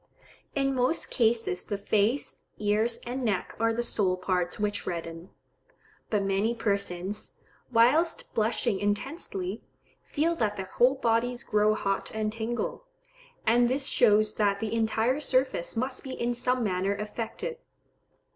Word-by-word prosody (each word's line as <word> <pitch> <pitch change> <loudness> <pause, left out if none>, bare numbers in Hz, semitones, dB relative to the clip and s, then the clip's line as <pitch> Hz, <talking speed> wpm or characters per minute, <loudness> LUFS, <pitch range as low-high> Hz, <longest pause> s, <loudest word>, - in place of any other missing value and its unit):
In 275 -1 +1
most 255 +5 0
cases 225 -6 +1
the 205 - -3
face, 210 +6 0 0.2
ears 215 +3 +1
and 250 +2 -3
neck 205 -6 -1
are 230 0 +3
the 235 +1 -1
sole 190 -6 +1
parts 180 -1 -1
which 205 -1 -1
redden; 165 0 -5 0.8
but 210 -2 +1
many 195 +4 +1
persons, 200 -2 -2 0.4
whilst 295 +9 +3
blushing 220 -1 +1
intensely, 205 - -3 0.4
feel 330 +3 0
that 210 -4 0
their 190 -1 -6
whole 250 +3 +5
bodies 240 -1 0
grow 210 0 +3
hot 195 -2 -1
and 215 -1 -1
tingle; 235 - -3 0.6
and 240 +2 +4
this 270 +2 0
shows 215 -4 +4
that 200 -2 +2
the 220 0 -3
entire 225 +4 +1
surface 260 - +1
must 260 +2 -2
be 265 - -6
in 240 +1 0
some 250 +1 +1
manner 195 0 0
affected. 230 - -5
220 Hz, 135 wpm, -28 LUFS, 200-245 Hz, 0.8 s, whole